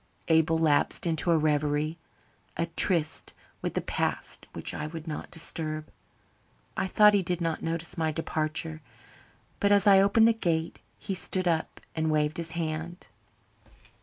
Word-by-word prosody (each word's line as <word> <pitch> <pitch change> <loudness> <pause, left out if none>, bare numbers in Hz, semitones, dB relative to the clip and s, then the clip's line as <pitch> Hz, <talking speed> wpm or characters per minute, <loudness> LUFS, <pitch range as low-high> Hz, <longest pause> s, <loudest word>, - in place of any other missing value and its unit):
Abel 160 0 +4
lapsed 155 0 +2
into 165 0 0
a 165 - +5
reverie 150 +1 0 0.6
a 170 - +1
tryst 165 -5 +1 0.3
with - - -3
the - - +1
past - - -3
which - - -5
I 150 - -4
would 165 +1 -8
not 150 - -5
disturb. 155 -2 -3 0.8
I 190 - -1
thought 210 +2 +6
he 200 - +4
did 180 -1 -2
not 165 -2 -2
notice 165 +1 -3
my 160 -1 +1
departure, 155 0 -3 0.8
but 205 - +2
as 200 0 +5
I 195 -2 +7
opened 210 +3 +5
the 230 - +5
gate 170 -7 -1 0.2
he 195 - -4
stood 185 0 -2
up 165 -2 -1 0.2
and 160 -1 0
waved 150 0 +1
his 165 -1 -4
hand. 165 +2 -4
165 Hz, 155 wpm, -28 LUFS, 155-180 Hz, 0.8 s, I